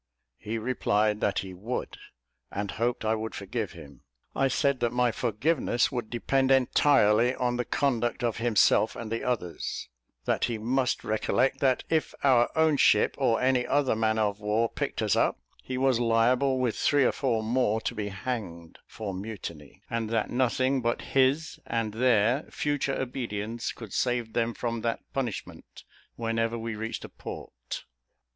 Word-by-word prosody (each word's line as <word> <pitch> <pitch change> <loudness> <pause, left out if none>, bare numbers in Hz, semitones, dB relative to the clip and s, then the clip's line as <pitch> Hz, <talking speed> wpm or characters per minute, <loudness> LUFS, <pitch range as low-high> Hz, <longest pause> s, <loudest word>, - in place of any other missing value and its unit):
He 110 +2 -4
replied 110 -3 +1
that 100 - +1
he 95 - -8
would, 110 +8 -4 0.6
and 100 0 -3
hoped 120 0 -1
I 110 - +2
would 110 0 -4
forgive 105 0 -4
him. 70 -5 -13 0.3
I 135 - +3
said 135 +1 +1
that 120 -1 +1
my 125 -1 +2
forgiveness 120 +3 0
would 120 -4 -3
depend 130 +2 +1
entirely 125 -3 +4
on 120 -1 0
the 125 - -1
conduct 120 -3 0
of 115 -2 0
himself 115 -1 +3
and 115 -2 -6
the 115 - -2
others; 90 - -3 0.4
that - - +1
he 115 - -2
must 125 +4 0
recollect 125 +5 +1
that 130 -2 +2
if 160 -1 0
our 125 -4 +5
own 160 -2 +3
ship, - - +4
or 120 -5 +2
any 130 -1 +2
other 140 -4 +2
man 110 0 +1
of 105 -2 0
war, 110 +2 +1
picked - - -3
us - - +2
up, - - +1 0.2
he 130 - -4
was 130 -2 +2
liable, 120 +3 +3
with 125 -3 0
three 145 -2 +3
or - - +4
four 120 -5 0
more, 110 -1 +1
to 120 - -2
be 105 -3 -3
hanged 95 -6 -5
for 105 -3 -6
mutiny; 95 -7 -8
and 115 -2 -2
that 115 -1 0
nothing 130 +1 +1
but 120 0 -1
his 135 +4 +2
and 115 -2 -1
their 120 +2 +3
future 145 -2 -1
obedience 115 -3 -3
could 110 -5 -10
save 120 -3 0
them 115 0 0
from 115 -1 -3
that 115 0 -1
punishment, 125 -6 -5 0.3
whenever 115 0 -1
we 115 0 -4
reached 110 +2 -4
a - - -10
port. - - -8
115 Hz, 165 wpm, -28 LUFS, 110-130 Hz, 0.6 s, our